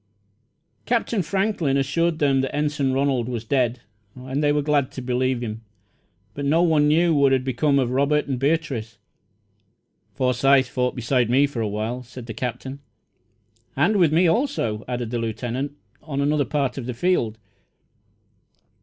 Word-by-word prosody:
Captain 230 -3 +1
Franklin 190 -6 0
assured 160 +5 0
them 140 -3 +2
that 135 - -3
Ensign 145 -2 0
Ronald 130 -3 0
was 120 -3 -4
dead, 125 -1 0 0.3
and 130 +3 -3
they 145 - +3
were 145 0 +1
glad 145 -2 +1
to - - -6
believe 125 0 0
him; 110 -1 -5 0.7
but 145 - -5
no 155 +5 +3
one 155 -3 +3
knew 165 +3 +3
what 140 -2 +4
had 130 -1 +2
become 140 +3 +1
of 125 -3 +1
Robert 140 +3 +2
and 135 -3 -3
Beatrice. 135 -7 -1 1.2
"Forsyth 130 +1 +3
fought 125 0 -1
beside 125 0 +1
me 135 +4 +4
for 140 -5 -4
a 110 - 0
while," 110 +4 -3
said 125 0 -10
the 115 - -6
Captain. 130 +4 -5 1.0
"And 215 0 +2
with 170 -5 +4
me, 170 +3 +4
also," 165 - 0
added 120 -2 -3
the 120 - -1
Lieutenant, 120 +5 -3 0.3
"on 140 -3 -5
another 145 0 +1
part 135 -1 -1
of 125 - -6
the 125 - -4
field." 120 -8 0
135 Hz, 160 wpm, -23 LUFS, 125-150 Hz, 1.2 s, what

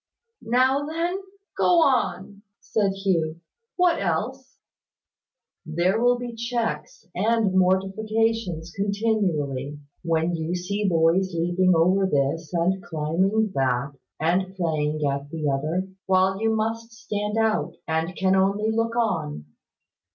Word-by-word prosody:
"Now 255 +4 +2
then, 340 +4 -2 0.4
go 345 -2 +4
on," 205 - 0 0.2
said 200 -3 0
Hugh. 170 -5 -1 0.4
"What 360 - +2
else?" 245 +10 -3 1.1
"There 175 +7 0
will 245 0 +4
be 245 0 -5
little 230 - -10
checks 235 -1 -3
and 215 0 +1
mortifications 190 -1 0
continually 185 - -1 0.2
when 165 0 0
you 165 +2 -2
see 200 +3 -1
boys 170 +2 +2
leaping 175 +2 +2
over 185 +4 +3
this, 145 +1 0
and 180 +2 +1
climbing 185 +7 0
that, 135 0 0 0.3
and 185 +4 0
playing 155 -4 -1
at 140 0 -2
the 155 -1 -3
other, 155 +7 -1 0.2
while 190 +1 +2
you 225 0 +2
must 225 +1 -2
stand 210 -1 -3
out, 220 -6 +1
and 160 +3 -1
can 190 0 +2
only 200 +3 +2
look 230 +1 -1
on. 75 - -1
190 Hz, 120 wpm, -24 LUFS, 165-220 Hz, 1.1 s, go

